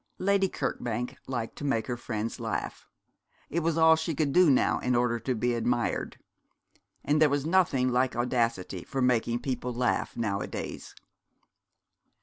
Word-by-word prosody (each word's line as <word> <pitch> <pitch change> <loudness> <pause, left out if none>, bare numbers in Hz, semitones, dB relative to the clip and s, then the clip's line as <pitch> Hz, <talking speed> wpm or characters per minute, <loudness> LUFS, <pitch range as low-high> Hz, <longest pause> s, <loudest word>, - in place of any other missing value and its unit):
Lady 195 0 +2
Kirkbank 120 -5 -3
liked 120 -4 -4
to - - -7
make 135 -6 0
her 125 - -3
friends 115 -2 -4
laugh. - - -4 0.6
It 170 - +1
was 165 0 0
all 160 0 +7
she 160 0 -3
could 140 -1 0
do 180 -2 +6
now 130 - +3
in 125 0 0
order 120 -1 +1
to 125 +3 -2
be 120 +2 0
admired. 120 +1 -1 0.9
And 150 +1 +2
there 150 -2 +5
is 145 0 0
nothing 160 -7 +2
like 125 +1 +1
audacity 115 -7 -1
for 135 -2 -2
making 120 -1 +1
people 125 -1 -3
laugh 125 +1 -1
nowadays. 100 -4 -4
125 Hz, 150 wpm, -28 LUFS, 120-150 Hz, 0.9 s, all